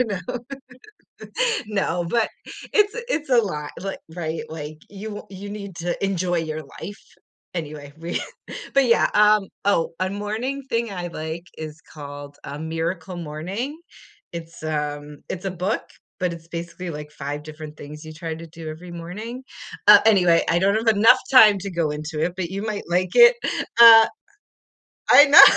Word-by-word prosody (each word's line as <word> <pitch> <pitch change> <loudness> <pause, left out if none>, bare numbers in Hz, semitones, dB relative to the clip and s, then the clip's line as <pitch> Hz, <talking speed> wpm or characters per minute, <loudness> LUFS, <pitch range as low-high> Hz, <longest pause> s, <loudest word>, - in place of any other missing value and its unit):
you 250 - +4
know? 200 -4 -3 1.5
No, 185 -4 -1
but 230 -2 +2 0.5
it's 420 0 +4
a 480 - -3
it's 305 -4 -4
a 245 - +5
lot, 150 -9 -1
like, 195 0 -5
right? 160 -2 -3
Like 155 -1 -7
you 205 +1 -7
you 200 +1 -8
need 200 -4 -7
to 175 +1 -2
enjoy 180 -2 0
your 155 -1 -4 0.2
life. 205 - -7 0.5
Anyway, 150 -3 -6
we 170 +1 -3 0.5
but 275 -1 +5
yeah, 230 - +4
um 210 -1 +5 0.2
Oh, 170 -5 +1
a 185 0 0
morning 220 +7 -3
thing 230 -3 -1
I 175 -2 -4
like 160 +2 -6
is 155 0 -7
called 145 -1 -10
a 145 +1 -6
Miracle 165 +3 -3
Morning. 185 - -5 0.5
It's, 165 0 -8
u 150 -1 -3
It's 190 +1 -4
a - - -1
book, 185 +5 -1 0.4
but 180 -2 0
it's 165 0 -13
basically, 170 +1 -6
like, 150 -1 -7
5 145 +1 -5
different 155 0 -10
things 150 +2 -10
you 155 - -9
try 160 0 -5
to 165 +1 -9
do 160 0 -9
every 175 +3 -10
morning. 210 +9 -7 0.5
Uh, 210 -1 +11
anyway, 180 -6 +5
I 170 - +3
don't 195 +3 +3
have 225 -1 +3
enough 225 +5 +6
time 215 -6 +8
to 195 +1 -5
go 170 -3 0
into 150 +1 -5
it, 175 +2 0
but 175 -2 -3
you 195 +1 -4
might 215 -2 -3
like 180 +1 0
it, 480 0 +8 0.4
uh 225 -1 +11 1.0
I 285 - +9
know, 290 +4 +10
175 Hz, 170 wpm, -23 LUFS, 155-210 Hz, 1.5 s, Uh